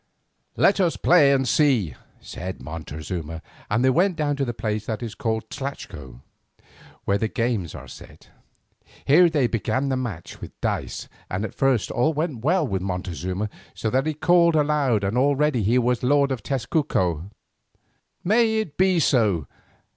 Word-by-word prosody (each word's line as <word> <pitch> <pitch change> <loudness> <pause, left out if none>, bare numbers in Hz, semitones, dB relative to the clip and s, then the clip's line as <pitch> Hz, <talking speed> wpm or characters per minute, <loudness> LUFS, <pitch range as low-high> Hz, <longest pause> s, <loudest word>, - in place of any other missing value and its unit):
"Let 200 - +4
us 175 -4 +2
play 150 -6 +5
and 135 -2 +2
see," 125 - +2 0.3
said 95 +1 -7
Montezuma, 80 +2 -6 0.3
and 115 +5 +2
they 130 - +5
went 180 +6 +2
down 145 -2 0
to 140 - 0
the 120 - -2
place 110 -2 -3
that 110 +1 -3
is 115 -3 -5
called 110 -1 -2
tlachco, 75 - -7 0.8
where 100 +1 +1
the 110 - 0
games 115 - -2
are - - -9
set. - - -14 0.7
Here 170 +5 +6
they 150 -5 +1
began 120 +4 -1
the 130 - +1
match 110 -10 -6
with - - -10
dice - - -3 0.2
and 95 +3 -2
at - - -7
first 135 -5 +1
all 155 +7 +1
went 150 -7 -2
well 170 +3 +2
for 95 -5 -1
Montezuma, 90 +1 -3 0.3
so 110 - -2
that 135 +4 +1
he 155 - -1
called 170 +1 +4
aloud 145 -8 +2
that 100 +3 -1
already 140 0 +2
he 110 +5 +2
was 125 0 +1
lord 140 +2 +3
of 130 -4 -2
Tezcuco. 115 - -1 0.9
"May 220 +3 +3
it 210 -10 -3
be 185 -2 +4
so!" 105 - +2
125 Hz, 160 wpm, -24 LUFS, 100-150 Hz, 0.9 s, Here